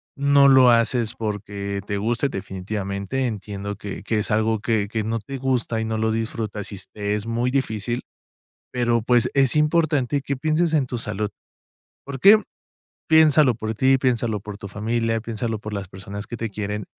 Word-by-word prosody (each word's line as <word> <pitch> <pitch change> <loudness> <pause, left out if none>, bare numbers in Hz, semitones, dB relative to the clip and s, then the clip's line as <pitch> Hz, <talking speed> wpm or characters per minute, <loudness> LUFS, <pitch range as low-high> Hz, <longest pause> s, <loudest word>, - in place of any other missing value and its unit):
no 140 0 +5
lo 130 -2 +7
haces 115 -1 +2
porque 100 -2 -4
te 100 - -2
guste 115 +6 0
definitivamente, 100 +4 -3
entiendo 100 -2 -5
que 100 -1 -7
que 110 +1 0
es 105 - -3
algo 110 0 +1
que 110 -4 0
que 110 0 -2
no 115 +2 -2
te 135 +6 -7
gusta 125 -3 -1
y - - -1
no 110 0 -2
lo 110 0 0
disfrutas, 110 -2 -4
y 100 - -6 0.2
te 105 -1 -2
es 105 0 -4
muy 120 +2 0
difícil, 120 -3 -1 0.7
pero, 120 -2 +1
pues, 120 +1 +2
es 135 +1 +3
importante 150 -3 +2
que 140 0 -3
pienses 160 +3 +1
en 145 - +3
tu 125 -1 -4
salud, 105 -1 -3 0.8
¿por 140 -1 -5
qué?, 215 +7 +7 0.7
piénsalo 155 -4 +5
por 110 0 -4
ti, 130 +3 +3
piénsalo 120 -4 0
por 100 +1 -8
tu 100 - -8
familia, 115 +3 -1
piénsalo 115 -1 -3
por 105 0 -7
las 100 -2 -4
personas 100 +2 -8
que 120 - -6
te 115 -1 -3
quieren, 105 0 -4
115 Hz, 180 wpm, -23 LUFS, 105-130 Hz, 0.8 s, lo